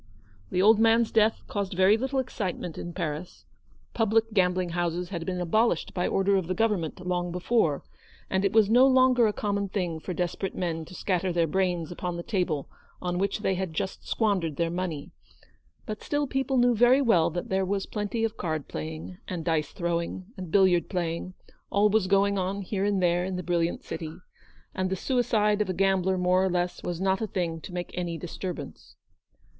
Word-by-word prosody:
The 185 - +1
old 215 +1 +6
man's 225 0 +4
death 220 0 +3
caused 200 -3 -3
very 190 +3 +5
little 265 +4 -2
excite 215 -8 -2
ment 170 - -6
in 175 - -6
Paris. 170 -1 -5 0.5
Public 225 0 +2
gambling 180 -2 +2
houses 175 +1 -2
had 170 -4 -5
been 180 -1 -2
abolished 180 +1 +1
by 180 - -1
the - - -1
order 195 0 +2
of 185 -3 -2
the 185 - -1
Government 190 -6 -1
long 175 -1 -1
before; 180 -4 +1 0.4
and 190 0 0
it 200 - +2
was 220 -2 +5
no 245 +5 +6
longer 255 -3 +5
a - - +2
common 200 -1 -2
thing 180 -5 -2
for 180 +2 -5
desperate 180 +2 -2
men 165 -3 -2
to 185 - -12
scatter 185 -1 0
their 170 -1 +2
brains 175 -1 0
upon 175 0 -4
the 170 - -5
table 180 -9 -1 0.3
on 180 0 -2
which 200 +2 -1
they 195 - +1
had 185 -3 -3
just 190 - -4
squandered 190 -9 0
their 165 +2 0
money; 175 -4 -4 0.7
but 215 -2 -5
still 290 0 -1
people 270 0 -1
knew 245 0 +5
very 245 +4 +5
well 180 -10 +4
that 175 +1 -5
there 190 0 +1
was 195 +1 -1
plenty 210 +2 -3
of 225 0 -1
card 155 -4 -3
playing, 80 +3 -6
and 170 -3 -4
dice 155 -3 0
throwing, 170 +1 -2
and 185 -3 -7
billiard 180 -2 +4
playing, 175 0 -3 0.3
always 210 -1 +3
going 200 +1 +3
on 195 +2 -2
here 195 +1 -2
and 200 -2 +1
there 175 0 +2
in 185 0 -3
the 180 - -4
brilliant 170 -1 0
city, 160 -1 -6 0.6
and 185 0 -1
the 190 - 0
suicide 215 -2 +1
of 205 - -1
a 185 - -1
gambler 190 0 +2
more 180 +1 +3
or 190 - +2
less 175 0 -1
was 175 -1 -4
not 190 +1 +1
a 220 - -1
thing 170 -4 -2
to 180 - -9
make 175 0 -5
any 175 -2 -3
disturbance. 175 +1 -7
185 Hz, 195 wpm, -27 LUFS, 175-210 Hz, 0.7 s, old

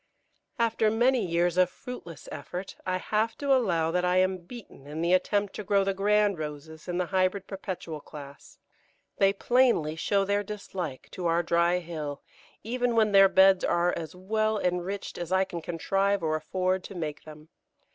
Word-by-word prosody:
] - - -46
After 225 -2 +2
many 240 +2 +2
years 175 0 +1
of 185 -1 +4
fruitless 180 - -9
effort 180 +2 -6
I 185 0 +1
have 220 +4 -1
to 280 -1 +2
allow 170 -11 +2
that 180 +1 0
I 180 0 +2
am 185 0 +2
beaten 175 - -12
in 155 +2 -5
the 175 +1 +2
attempt 200 +2 +1
to 210 - -6
grow 200 -1 +2
the 195 0 0
Grand 205 -1 +2
Roses 155 +1 -7
in 175 0 -2
the 180 - 0
Hybrid 185 +1 0
Perpetual 185 -6 -6
class. 140 -2 -12 0.6
They 195 0 +5
plainly 230 -7 +2
show 195 +4 +1
their 200 +1 +1
dislike 195 -8 -6
to 180 -2 -3
our 170 +1 +2
dry 170 +1 +2
hill, 155 -5 -6 0.4
even 245 +1 -1
when 215 -2 +3
their 195 -1 +7
beds 190 -1 +5
are 175 +1 +2
as 165 +1 -6
well 215 +4 0
enriched 180 +1 -3
as 175 0 -5
I 190 0 +4
can 175 -3 -6
contrive 195 +4 0
or 155 -1 +1
afford 185 +4 -1
to 195 - -9
make 155 -4 -5
them. 155 0 -13
185 Hz, 180 wpm, -28 LUFS, 170-205 Hz, 0.6 s, their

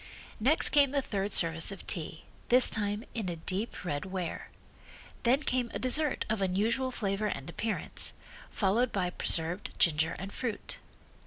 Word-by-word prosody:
Next 270 +9 +5
came 285 -2 +4
the 280 +1 0
third 200 -2 -3
service 165 0 +3
of 195 - -10
tea, 160 -2 0 0.3
this 250 +1 +7
time 205 0 -2
in 215 -6 -3
a 175 - -4
deep 185 +5 -2
red 145 -4 -3
ware. 185 -3 -5 0.7
Then 260 +4 +2
came 250 -3 -1
a - - 0
dessert 280 +4 0
of 215 -2 -1
unusual 210 +8 0
flavor 210 -3 -2
and 140 -9 -5
appearance, 215 +6 -1 0.4
followed 225 +5 +1
by 180 -3 -1
preserved 175 +3 +1
ginger 160 0 +2
and 195 +2 -8
fruit. 230 -5 -4
205 Hz, 155 wpm, -30 LUFS, 180-240 Hz, 0.7 s, this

